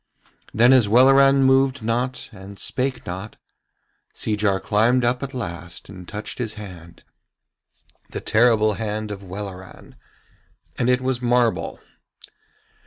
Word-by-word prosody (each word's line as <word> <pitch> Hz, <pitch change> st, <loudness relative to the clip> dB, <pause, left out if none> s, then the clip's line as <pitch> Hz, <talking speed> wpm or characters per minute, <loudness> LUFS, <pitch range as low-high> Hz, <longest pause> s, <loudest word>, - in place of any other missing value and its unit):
Then 120 Hz, +4 st, +5 dB
as 125 Hz, -5 st, +5 dB
Welleran 135 Hz, +3 st, +6 dB
moved 135 Hz, -1 st, +3 dB
not 120 Hz, +3 st, -2 dB
and 100 Hz, 0 st, -11 dB
spake 130 Hz, +4 st, -2 dB
not, 95 Hz, +4 st, -6 dB, 0.8 s
Seejar 105 Hz, -3 st, 0 dB
climbed 115 Hz, +5 st, +2 dB
up 125 Hz, +1 st, 0 dB
at 140 Hz, -1 st, -6 dB
last 85 Hz, -8 st, -7 dB
and 90 Hz, -3 st, -11 dB
touched 105 Hz, +4 st, -7 dB
his 110 Hz, -3 st, -3 dB
hand, 90 Hz, -5 st, -11 dB, 1.1 s
the -, -, -5 dB
terrible 110 Hz, -1 st, +3 dB
hand 105 Hz, 0 st, -4 dB
of 100 Hz, -1 st, -7 dB
Welleran, 95 Hz, -1 st, -9 dB, 0.8 s
and 125 Hz, -, 0 dB
it 125 Hz, 0 st, +2 dB
was 130 Hz, -1 st, -1 dB
marble. 120 Hz, -8 st, +1 dB
110 Hz, 120 wpm, -22 LUFS, 100-125 Hz, 1.1 s, Welleran